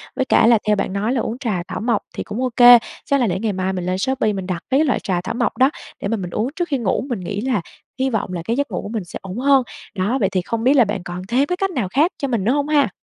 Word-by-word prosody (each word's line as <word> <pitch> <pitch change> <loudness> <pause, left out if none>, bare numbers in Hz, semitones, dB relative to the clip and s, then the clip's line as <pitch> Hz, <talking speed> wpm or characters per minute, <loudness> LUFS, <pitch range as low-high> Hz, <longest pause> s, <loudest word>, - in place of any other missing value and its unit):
với 265 - 0
cả 230 - +4
là 230 -2 +5
theo 210 - +4
bạn 195 - -2
nói 210 +5 0
là 250 - 0
uống 225 - -3
trà 215 -9 -2
thảo - - -5
mộc 230 -1 +1
thì - - -3
cũng 225 - -5
ô 255 - +1
kê, 245 -1 +9 0.3
chắc 280 - +2
là 245 - +2
để 185 -1 -1
ngày 215 -1 -1
mai 190 0 -1
mình 180 -2 -3
lên 185 +1 -1
Shopee 255 0 0
mình 190 -2 -4
đặt 180 -3 -2
mấy 265 - +4
cái 315 - +3
loại 265 - +1
trà 180 -3 -1
thảo 185 - -4
mộc 240 0 -1
đó 260 +1 +5 0.3
để - - -2
mà 230 - -1
mình 180 -3 -5
uống 215 +6 -1
trước 350 -2 -1
khi 280 - +1
ngủ, 235 +1 -1
mình 240 -5 -2
nghĩ 200 +3 -4
là 250 -5 0 0.4
hy 265 +1 +1
vọng 220 -6 -2
là 175 - -3
cái 230 - 0
giấc 285 +2 -1
ngủ - - -2
của - - -7
mình 220 -3 -3
sẽ 175 - -8
ổn 190 +2 -7
hơn. 270 +1 +4 0.3
Đó, 205 +7 0
vậy 195 - +2
thì 185 -1 0
không 225 +5 -3
biết 260 +3 +5
là 255 -5 +5
bạn 200 -3 -3
còn 175 +1 -6
thêm 255 +6 +2
cái 360 +4 -2
cách 390 +1 0
nào 250 - -1
khác 300 - +3
cho 280 - -2
mình 235 -7 -1
nữa 225 - +2
hông 285 +1 0
ha? 290 -4 +3
230 Hz, 325 wpm, -20 LUFS, 195-265 Hz, 0.4 s, kê